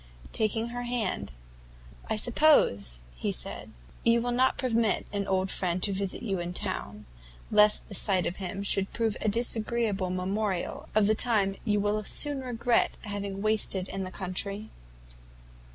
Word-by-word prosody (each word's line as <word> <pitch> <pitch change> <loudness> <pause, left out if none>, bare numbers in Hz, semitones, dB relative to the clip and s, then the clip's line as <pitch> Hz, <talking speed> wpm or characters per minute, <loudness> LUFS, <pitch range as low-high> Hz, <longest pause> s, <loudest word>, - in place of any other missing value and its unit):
Taking 225 +1 0
her 245 +1 -5
hand, 240 - -2 0.8
"I - - +1
suppose," 210 - +3
he - - -2
said, - - -5 0.3
"you 230 0 +4
will 245 +1 -1
not 255 +2 +2
permit 230 -4 +1
an 200 -1 -2
old 190 0 0
friend 180 -2 -1
to 200 - +2
visit 195 0 -3
you 195 -5 -1
in 175 +1 -5
town, 105 - -5 0.5
lest 210 0 +4
the - - -9
sight 190 -1 +1
of 175 - -3
him 195 +1 -4
should 195 -1 +2
prove 225 -3 0
a 215 - +1
disagreeable 220 -3 0
memorial 185 +1 -2
of 215 -1 +5
the 215 - +4
time 210 -4 +1
you 210 -1 +2
will 210 +1 0
soon 285 +6 +4
regret 245 -1 +1
having 200 -2 -5
wasted 210 -3 +2
in 195 0 -4
the 185 - -5
country?" 195 +3 -4
205 Hz, 155 wpm, -28 LUFS, 190-230 Hz, 0.8 s, of